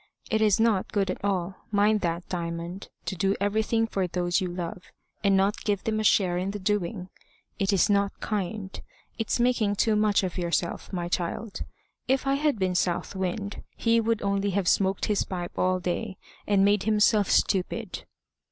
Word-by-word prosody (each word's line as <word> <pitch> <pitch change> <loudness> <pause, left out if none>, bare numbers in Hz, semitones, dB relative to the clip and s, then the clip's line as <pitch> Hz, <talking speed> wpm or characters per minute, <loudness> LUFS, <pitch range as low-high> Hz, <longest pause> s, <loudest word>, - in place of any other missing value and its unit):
It 220 -1 +2
is 210 -2 +4
not 220 -4 +2
good 195 -2 +1
at - - -7
all 190 -2 -1
mind 210 +1 +3
that, 170 -1 -2
Diamond 170 +1 -5 0.2
to 190 - -3
do 195 +2 +1
everything 220 +3 +1
for 195 -4 -1
those 175 0 0
you 185 - -1
love, 180 +1 -5 0.4
and 195 -1 +4
not 195 +2 +1
give 205 -3 0
them 220 -1 0
a - - 0
share 185 -4 +3
in 185 +2 -2
the 205 - -3
doing. 190 -1 -2 0.5
It's 195 -2 +3
not 200 -1 +1
kind. 200 -1 -3 0.4
It's 225 +2 0
making 235 -4 +2
too 220 +2 +2
much 210 -1 +3
of 185 0 -3
yourself, 170 0 -2
my 175 -3 -2
child. 185 +5 -3 0.5
If 265 +1 +1
I 275 - +2
had 290 -2 +1
been 185 -2 0
South 180 +2 -1
Wind, 195 +2 -3
he 230 0 +2
would 225 -1 0
only 200 0 +1
have 190 -3 0
smoked 195 0 +2
his 210 -2 +1
pipe 175 -2 -5
all 185 0 +1
day, 185 +3 -3 0.3
and 200 -1 +4
made 205 0 +3
himself 210 -1 +3
stupid." 185 -2 0
200 Hz, 180 wpm, -27 LUFS, 185-215 Hz, 0.5 s, is